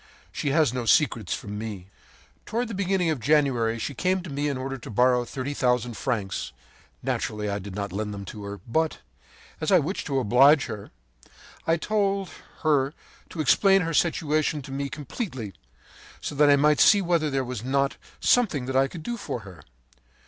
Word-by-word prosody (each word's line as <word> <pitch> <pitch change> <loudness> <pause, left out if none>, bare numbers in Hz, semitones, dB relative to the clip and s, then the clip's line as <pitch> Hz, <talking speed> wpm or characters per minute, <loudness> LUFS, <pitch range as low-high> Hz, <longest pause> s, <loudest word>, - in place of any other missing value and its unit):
She 145 - -2
has 145 -3 +3
no 125 -2 -3
secrets 115 - +3
from 105 0 -6
me. 105 -5 -6 0.6
“Toward 235 +2 -1
the - - -5
beginning 190 -3 +1
of 150 - -2
January 125 -5 +2
she 115 - -4
came 185 +6 0
to 170 - -8
me 145 +1 -1
in 140 -2 -1
order 135 +1 -4
to - - -10
borrow 125 +2 +3
thirty 135 +3 -4
thousand 125 -3 0
francs. 100 - -3 0.5
Naturally, 105 -1 -2
I 100 - -2
did 100 -1 -8
not 100 -2 -4
lend 105 +1 -3
them 100 -1 -6
to 105 +1 -8
her; 100 0 -6
but, 160 +7 0 0.6
as 155 - -1
I 185 - +7
wished 170 +5 -2
to 140 -3 -1
oblige 135 +4 +5
her, 110 -4 -7 0.8
I 165 +1 +3
told 195 0 0 0.3
her 145 -2 +2 0.3
to 160 - -4
explain 195 +5 +4
her 165 -1 -2
situation 155 -2 +1
to 135 - -10
me 140 +1 -3
completely, 135 - -5 0.7
so - - -5
that 145 +1 +4
I 145 - +7
might 150 +1 +3
see 205 -2 +6
whether 170 -3 +1
there 135 -2 -1
was 125 -3 -5
not 140 +2 0 0.2
something 145 - +2
I 135 +1 +4
could 160 +2 -9
do 240 +5 -3
for 125 - -5
her. 95 -7 -12
140 Hz, 185 wpm, -26 LUFS, 115-160 Hz, 0.8 s, I